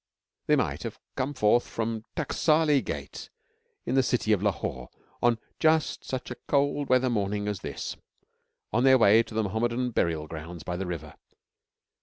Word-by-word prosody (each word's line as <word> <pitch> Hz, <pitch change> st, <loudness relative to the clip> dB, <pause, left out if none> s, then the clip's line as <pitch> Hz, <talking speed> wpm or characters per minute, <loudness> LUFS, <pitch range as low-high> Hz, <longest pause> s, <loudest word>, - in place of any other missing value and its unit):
They -, -, +5 dB
might -, -, -1 dB
have -, -, -6 dB, 0.2 s
come 140 Hz, +3 st, -2 dB
forth 120 Hz, 0 st, +3 dB
from 115 Hz, 0 st, -2 dB
the 110 Hz, -, -22 dB, 0.2 s
Taksali 155 Hz, -2 st, +3 dB
Gate -, -, -6 dB, 0.6 s
in 125 Hz, -, -1 dB
the 135 Hz, -, +5 dB
city 125 Hz, -3 st, 0 dB
of 100 Hz, -, +1 dB
Lahore 85 Hz, -11 st, -2 dB, 0.3 s
on 120 Hz, -1 st, +3 dB, 0.2 s
just 160 Hz, -1 st, +2 dB
such 130 Hz, -1 st, -4 dB
a -, -, -4 dB
cold 145 Hz, 0 st, +1 dB
weather 130 Hz, 0 st, +4 dB
morning 105 Hz, -1 st, -1 dB
as 105 Hz, -2 st, -2 dB
this, -, -, -5 dB, 0.8 s
on 120 Hz, +3 st, +3 dB
their 130 Hz, 0 st, +7 dB
way 110 Hz, -1 st, +6 dB
to 115 Hz, -, -8 dB
the 110 Hz, -, +2 dB
Mohammedan 120 Hz, +4 st, -1 dB
burial 80 Hz, -7 st, 0 dB
grounds 80 Hz, +1 st, -8 dB
by 90 Hz, -, -3 dB
the 95 Hz, +1 st, -3 dB
river. 80 Hz, -4 st, -5 dB
115 Hz, 170 wpm, -27 LUFS, 100-130 Hz, 0.8 s, their